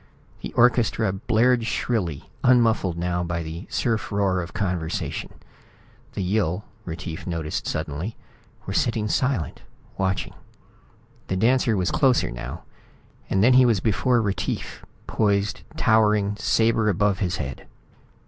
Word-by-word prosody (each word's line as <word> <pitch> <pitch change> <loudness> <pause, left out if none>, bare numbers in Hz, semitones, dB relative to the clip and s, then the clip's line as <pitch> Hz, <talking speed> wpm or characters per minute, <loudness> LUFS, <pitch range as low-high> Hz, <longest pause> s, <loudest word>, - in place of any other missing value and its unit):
The - - -6
orchestra 115 -4 +3
blared 115 +4 +2
shrilly, 95 - -2 0.2
unmuffled 115 -8 +3
now 90 0 -1
by 85 -1 -2
the 80 +4 -7
surf 115 -3 -1
roar 100 -2 +1
of 85 - -7
conversation. 90 -5 -3 0.8
The 100 - -3
Yill, 95 0 0 0.2
Retief 80 0 -6
noticed 80 -3 -3
suddenly, 80 +8 -3 0.5
were - - -4
sitting 110 -2 0
silent, 130 - -1 0.4
watching. 95 0 -1 0.9
The 95 - -1
dancer 115 +1 +3
was 90 -1 0
closer 135 - +3
now, - - -7 0.7
and 95 +1 +2
then 125 +3 +6
he 130 0 +7
was 110 -4 +3
before 115 +3 +2
Retief, 100 -2 -3 0.2
poised, 100 -2 0 0.2
towering, 105 -2 +3
sabre 110 +1 +2
above 100 0 +1
his 90 -3 -1
head. 65 -1 -6
100 Hz, 125 wpm, -24 LUFS, 90-115 Hz, 0.9 s, he